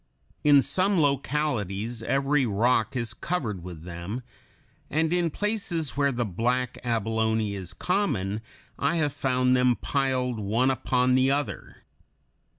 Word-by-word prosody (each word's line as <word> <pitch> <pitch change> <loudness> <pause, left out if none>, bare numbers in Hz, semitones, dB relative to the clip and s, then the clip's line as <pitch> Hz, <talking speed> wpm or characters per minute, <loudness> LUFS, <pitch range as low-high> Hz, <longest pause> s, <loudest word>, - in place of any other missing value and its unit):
In 145 -2 +6
some 190 0 +2
localities 125 - -1
every 135 +2 +1
rock 110 +2 +1
is 115 -3 -2
covered 115 - -3
with 85 -3 -8
them, 90 +8 -6 0.7
and 160 +2 +1
in 175 -1 +2
places 175 - -2
where 140 0 +2
the 120 -2 -1
black 120 +6 -1
abalone 110 -2 0
is 95 -3 -6
common, 110 - 0 0.4
I 170 - +1
have 150 -4 +1
found 130 -2 +2
them 125 -1 +3
piled 130 -4 -1
one 115 +6 +2
upon 125 -1 +1
the 130 +1 +4
other. 140 -8 -3
125 Hz, 130 wpm, -26 LUFS, 110-145 Hz, 0.7 s, In